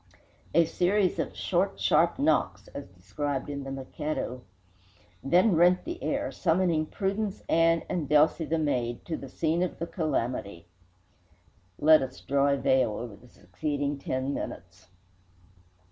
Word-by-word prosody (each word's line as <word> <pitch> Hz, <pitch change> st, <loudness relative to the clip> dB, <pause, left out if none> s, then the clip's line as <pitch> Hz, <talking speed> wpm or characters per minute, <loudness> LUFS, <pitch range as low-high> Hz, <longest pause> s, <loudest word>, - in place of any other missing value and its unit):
A 170 Hz, 0 st, +6 dB
series 185 Hz, +3 st, +1 dB
of -, -, -3 dB
"short, -, -, 0 dB
sharp -, -, +3 dB
shocks" -, -, +1 dB
(as -, -, -8 dB
described 130 Hz, +11 st, -4 dB
in 140 Hz, -1 st, -5 dB
"The 135 Hz, -, -6 dB
Mikado") 135 Hz, -1 st, -4 dB, 0.8 s
then 180 Hz, +8 st, +4 dB
rent 175 Hz, +2 st, +4 dB
the 340 Hz, +2 st, -6 dB
air, 290 Hz, +1 st, -1 dB
summoning 165 Hz, -3 st, +1 dB
Prudence 200 Hz, +2 st, -3 dB
Ann 165 Hz, 0 st, +3 dB
and 155 Hz, -6 st, -3 dB
Delcy, 155 Hz, +2 st, +3 dB
the 165 Hz, -, +1 dB
maid, 125 Hz, -6 st, -1 dB
to 165 Hz, -, -3 dB
the 135 Hz, -, -8 dB
scene 165 Hz, +5 st, 0 dB
of 180 Hz, -, -2 dB
the 170 Hz, -, -3 dB
calamity. 125 Hz, -, -3 dB, 1.1 s
Let 155 Hz, +1 st, +6 dB
us 130 Hz, -1 st, -5 dB
draw 140 Hz, +1 st, +1 dB
a 140 Hz, 0 st, +2 dB
veil 130 Hz, -5 st, +2 dB
over 115 Hz, 0 st, -6 dB
the 125 Hz, -, -18 dB
succeeding 140 Hz, -, -3 dB
ten 130 Hz, +1 st, -2 dB
minutes. 85 Hz, -6 st, -7 dB
150 Hz, 145 wpm, -28 LUFS, 130-170 Hz, 1.1 s, A